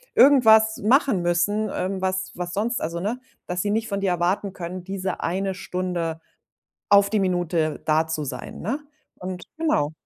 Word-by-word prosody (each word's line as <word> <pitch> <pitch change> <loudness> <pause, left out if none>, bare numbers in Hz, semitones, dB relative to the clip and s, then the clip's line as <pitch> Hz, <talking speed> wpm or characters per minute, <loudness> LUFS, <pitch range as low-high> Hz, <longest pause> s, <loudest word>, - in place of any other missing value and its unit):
irgendwas 220 -5 +6
machen 235 - +3
müssen, 205 +5 +1
ähm, 190 +1 -2
was 190 0 -1
was 175 0 -4
sonst 230 +4 -1
also, 170 +2 -3
ne, 215 +7 -2 0.3
dass 180 0 -2
sie 205 - 0
nicht 225 +1 0
von 200 -1 -2
dir 195 -2 +1
erwarten 180 +3 0
können, 180 0 -6
diese 190 0 -4
eine 190 +2 -1
Stunde 175 -3 -3 0.7
auf 200 0 +6
die 215 - +1
Minute 175 -4 0
da 155 +1 +3
zu 155 -2 -3
sein, 125 -2 -7
ne? 235 - -2 0.4
Und 185 -1 -7
genau. 230 - +1
185 Hz, 165 wpm, -24 LUFS, 175-210 Hz, 0.7 s, irgendwas